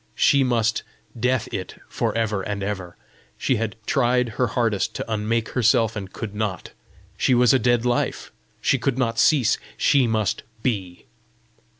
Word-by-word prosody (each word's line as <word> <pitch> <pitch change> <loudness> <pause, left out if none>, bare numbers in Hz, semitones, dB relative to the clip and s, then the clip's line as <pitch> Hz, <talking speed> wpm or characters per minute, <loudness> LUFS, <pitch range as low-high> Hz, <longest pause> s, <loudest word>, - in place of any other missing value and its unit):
She 140 -1 +4
must 115 -3 +1 0.3
DEATH 125 0 0
IT 95 - -5
for - - -2
ever 110 -3 0
and 100 0 -4
ever! 95 -3 -5 0.4
She 130 - +1
had 110 -1 -3
tried 125 -2 +2
her 125 +3 0
hardest 115 -4 0
to - - -3
unmake 110 +2 -1
herself, 115 -2 +2
and 95 -3 -6
could 110 -3 -6
not! 105 -3 -3 0.5
she 130 - +3
was 125 0 +5
a 130 - +4
dead 120 -1 +2
life! 120 -1 -1 0.3
she - - +2
could 135 -2 -1
not 115 -3 0
cease! 130 -7 +4 0.2
she 135 -4 +3
must 110 -2 0 0.2
BE! 95 -8 -3
115 Hz, 160 wpm, -23 LUFS, 105-125 Hz, 0.5 s, was